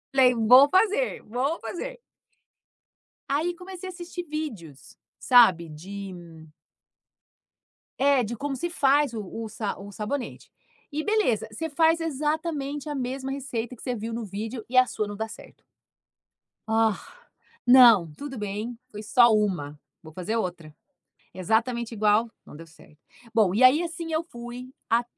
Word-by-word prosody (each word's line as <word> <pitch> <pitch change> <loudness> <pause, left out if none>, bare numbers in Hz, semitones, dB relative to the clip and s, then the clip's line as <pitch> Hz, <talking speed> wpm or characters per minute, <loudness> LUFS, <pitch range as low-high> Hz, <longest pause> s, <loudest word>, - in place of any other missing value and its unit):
Falei: 255 -2 +6
“Vou 245 +4 +7
fazer, 425 +7 +2
vou 260 +9 -2
fazer”. - - -6 1.3
Aí, 320 +5 0
comecei 370 +1 -9
a - - -7
assistir 350 0 -7
vídeos, 190 - -7 0.2
sabe, 190 -10 +5
de 190 +5 -8 1.9
É, 275 -1 +4
de 235 +1 -4
como 275 +3 -3
se 345 +6 -3
faz 285 -4 +2
o 220 - -4
o 220 +3 -7
sa 210 -1 -4
o 200 +1 -10
sabonete, 240 +6 -5 0.4
e 305 +2 -3
beleza, 365 - +1
você 320 +10 -4
faz 325 +2 +3
exatamente 300 -1 -2
a 295 - -3
mesma 265 +1 -4
receita 250 -3 -4
que - - -15
você 250 -2 -2
viu 225 +1 -5
no 230 0 -4
vídeo 215 +4 -6
e 255 - -3
a 255 - +7
sua 215 -3 -3
não 205 0 -7
dá 220 +1 -4
certo. - - -14 1.0
Ah, 220 -1 +2 0.7
não, 235 -10 +7
tudo 270 - -7
bem, 210 +3 -5
foi 210 0 -8
só 235 +2 +5
uma. 175 -9 -1 0.2
Vou 160 -1 -13
fazer 185 +6 -3
outra, 175 -7 -4 0.6
exatamente 225 +5 0
igual. 215 +2 +2
Não - - -14
deu 165 +1 -11
certo. 155 -1 -20 0.4
Bom, 200 -5 +3
e 245 - +2
aí 280 +7 +6
assim 330 -1 -5
eu 315 - +1
fui 240 -2 -9 0.2
a 235 +1 +3
240 Hz, 150 wpm, -26 LUFS, 210-290 Hz, 1.9 s, Vou